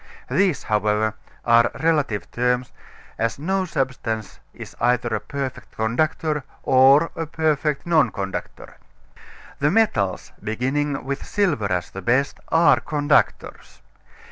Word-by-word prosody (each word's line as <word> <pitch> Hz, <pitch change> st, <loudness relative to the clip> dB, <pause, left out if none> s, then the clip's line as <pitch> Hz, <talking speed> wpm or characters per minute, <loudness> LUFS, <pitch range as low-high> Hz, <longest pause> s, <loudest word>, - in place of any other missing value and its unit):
These, 185 Hz, -5 st, +2 dB
however, 105 Hz, 0 st, +1 dB, 0.3 s
are 115 Hz, 0 st, +5 dB
relative 150 Hz, -10 st, 0 dB
terms, 125 Hz, +1 st, 0 dB, 0.5 s
as 115 Hz, +1 st, 0 dB
no 190 Hz, +6 st, -1 dB
substance 120 Hz, -, -3 dB
is -, -, -11 dB
either 125 Hz, 0 st, +2 dB
a -, -, 0 dB
perfect 140 Hz, -3 st, -6 dB
conductor 150 Hz, +6 st, 0 dB, 0.2 s
or 135 Hz, +5 st, +5 dB
a 165 Hz, -1 st, -4 dB
perfect 150 Hz, -2 st, 0 dB
non 155 Hz, -7 st, +3 dB
conductor. 95 Hz, -2 st, -6 dB, 0.8 s
The 145 Hz, -, +2 dB
metals, 135 Hz, -, +1 dB
beginning 135 Hz, +6 st, -1 dB
with 140 Hz, +1 st, -3 dB
silver 145 Hz, -, 0 dB
as 90 Hz, -1 st, -2 dB
the 95 Hz, -, -7 dB
best, 130 Hz, +8 st, +1 dB
are 165 Hz, -1 st, +4 dB
conductors. 150 Hz, 0 st, -1 dB
135 Hz, 115 wpm, -22 LUFS, 115-155 Hz, 0.8 s, are